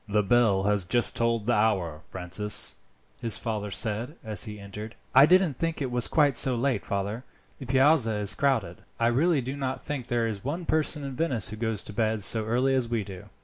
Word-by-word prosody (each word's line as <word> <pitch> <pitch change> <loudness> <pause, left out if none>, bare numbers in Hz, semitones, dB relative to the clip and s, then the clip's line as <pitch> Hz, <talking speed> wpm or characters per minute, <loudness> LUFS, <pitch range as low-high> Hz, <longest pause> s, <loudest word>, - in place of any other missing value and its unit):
"The 105 0 +1
bell 100 -2 +2
has 100 -1 +1
just 120 +7 +1
tolled 115 -2 0
the 120 - +1
hour, 95 -8 0
Francis," 95 +3 +2 0.4
his 115 -3 0
father 105 -3 -4
said 110 +7 -2
as 110 0 -1
he 105 -1 -8
entered. 105 +3 -9 0.2
"I 135 +3 +7
didn't 185 -3 +4
think 165 -1 -2
it 135 -3 -3
was 120 -1 +3
quite 145 -4 +2
so 125 +2 +4
late, 120 -3 -1
father; 100 +4 -3 0.4
the 130 - -9
Piazza 130 -3 +3
is 105 -1 +2
crowded. 115 -11 -1 0.2
I 115 - +1
really 140 +6 +2
do 130 +3 -5
not 130 -2 -3
think 135 -4 -6
there 120 -1 0
is 105 -3 -5
one 165 +7 -4
person 155 -2 0
in 135 -2 -6
Venice 130 - -1
who 110 - -7
goes 110 -2 -2
to 105 - -7
bed 110 -1 -1
so 110 +2 +3
early 125 +4 +1
as 130 -3 0
we 115 -3 -1
do. 95 -2 -10
115 Hz, 210 wpm, -26 LUFS, 105-135 Hz, 0.4 s, I